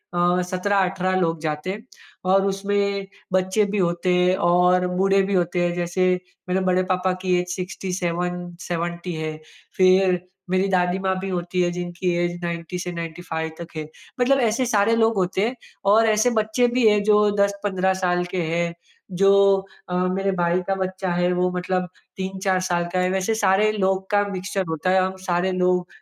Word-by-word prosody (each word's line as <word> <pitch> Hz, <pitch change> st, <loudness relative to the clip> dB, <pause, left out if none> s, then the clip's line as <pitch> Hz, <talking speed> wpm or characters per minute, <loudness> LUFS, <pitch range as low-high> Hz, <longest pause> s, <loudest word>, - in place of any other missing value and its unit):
अ, 175 Hz, +1 st, +2 dB
17-18 185 Hz, 0 st, 0 dB
लोग 165 Hz, -2 st, 0 dB
जाते 155 Hz, +2 st, -3 dB
हैं, 215 Hz, +3 st, -7 dB, 0.4 s
और 195 Hz, +1 st, +3 dB
उसमें 200 Hz, 0 st, -1 dB, 0.3 s
बच्चे 190 Hz, +3 st, +2 dB
भी 210 Hz, -, -1 dB
होते 175 Hz, 0 st, +1 dB
हैं 180 Hz, +1 st, +3 dB
और 180 Hz, +1 st, +4 dB
बूढ़े 195 Hz, +2 st, +2 dB
भी -, -, 0 dB
होते 175 Hz, -1 st, +1 dB
हैं। 175 Hz, -, 0 dB
जैसे 175 Hz, +1 st, 0 dB, 0.4 s
मेरे 190 Hz, +1 st, +1 dB
बड़े 185 Hz, 0 st, +2 dB
पापा 185 Hz, 0 st, +1 dB
की 180 Hz, -1 st, +2 dB
ऐज 180 Hz, -, -8 dB
67–70 175 Hz, -1 st, -4 dB
है, 155 Hz, -1 st, -4 dB, 0.4 s
फिर 185 Hz, -1 st, +4 dB, 0.3 s
मेरी 185 Hz, +1 st, +2 dB
दादी 180 Hz, 0 st, +1 dB
माँ 190 Hz, 0 st, +1 dB
भी 195 Hz, +1 st, -4 dB
होती 180 Hz, 0 st, -2 dB
है, 175 Hz, 0 st, +1 dB
जिनकी 175 Hz, 0 st, -2 dB
ऐज 175 Hz, 0 st, -4 dB
90 170 Hz, +1 st, -4 dB
से 180 Hz, 0 st, -4 dB
95 165 Hz, -1 st, -5 dB
तक 170 Hz, 0 st, -9 dB
है। 155 Hz, -1 st, -4 dB, 0.3 s
मतलब 270 Hz, +2 st, +3 dB
ऐसे 250 Hz, +4 st, 0 dB
सारे 225 Hz, -1 st, +2 dB
लोग 225 Hz, -1 st, +2 dB
होते 190 Hz, +3 st, +1 dB
हैं 250 Hz, -, -4 dB, 0.4 s
और 225 Hz, +1 st, +5 dB
ऐसे 215 Hz, +3 st, +3 dB
बच्चे 220 Hz, +3 st, +1 dB
भी 235 Hz, -3 st, +5 dB
हैं, 210 Hz, -1 st, +2 dB
जो 210 Hz, 0 st, +4 dB
10-15 200 Hz, -2 st, 0 dB
साल 175 Hz, 0 st, +1 dB
के 180 Hz, -, 0 dB
हैं। 170 Hz, 0 st, 0 dB, 0.4 s
जो 195 Hz, +2 st, +4 dB, 0.6 s
अ, 180 Hz, -, -2 dB, 0.2 s
मेरे 195 Hz, +1 st, 0 dB
भाई 175 Hz, +1 st, +1 dB
का 195 Hz, -, +1 dB
बच्चा 190 Hz, 0 st, -3 dB
है, 175 Hz, +1 st, +1 dB
वो 180 Hz, 0 st, +1 dB
मतलब 180 Hz, 0 st, -1 dB, 0.3 s
3-4 190 Hz, 0 st, -1 dB
साल 175 Hz, -1 st, 0 dB
का 185 Hz, -, +1 dB
है। 180 Hz, 0 st, +1 dB
वैसे 190 Hz, +3 st, 0 dB
सारे 210 Hz, +1 st, +3 dB
लोग 190 Hz, -1 st, 0 dB
का 205 Hz, 0 st, +3 dB
मिक्सचर 195 Hz, +1 st, -3 dB
होता 160 Hz, +3 st, -1 dB
है, 190 Hz, 0 st, +4 dB
हम 190 Hz, 0 st, -2 dB
सारे 180 Hz, 0 st, 0 dB
लोग 180 Hz, 0 st, +1 dB
185 Hz, 180 wpm, -23 LUFS, 175-195 Hz, 0.6 s, और